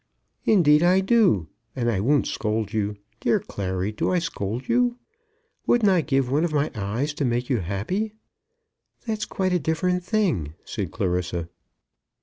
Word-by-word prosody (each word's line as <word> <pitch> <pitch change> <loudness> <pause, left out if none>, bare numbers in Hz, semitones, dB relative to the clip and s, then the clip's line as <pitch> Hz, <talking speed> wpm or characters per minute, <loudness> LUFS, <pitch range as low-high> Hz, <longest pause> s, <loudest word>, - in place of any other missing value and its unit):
"Indeed 150 -8 +5
I 180 +2 +5
do; 190 - +3 0.3
and 120 -3 -1
I 110 -5 +1
won't 140 +8 +2
scold 110 0 -2
you. 105 -1 -1 0.2
Dear - - +2
Clary, 95 0 -3
do 105 - -1
I 180 - +2
scold 120 - -3
you? 245 0 +2 0.7
Wouldn't 220 -5 +4
I 180 -3 +4
give 135 -4 0
one 150 +4 +2
of 170 - 0
my 150 0 +1
eyes 115 +8 -2
to 150 - -3
make 125 0 0
you 125 - +2
happy?" 105 - -2 0.9
"That's 220 -2 -2
quite 185 -1 -1
a 180 - +3
different 175 +4 0
thing," 175 - 0
said - - -4
Clarissa. 90 -2 -2
140 Hz, 155 wpm, -24 LUFS, -, 0.9 s, Indeed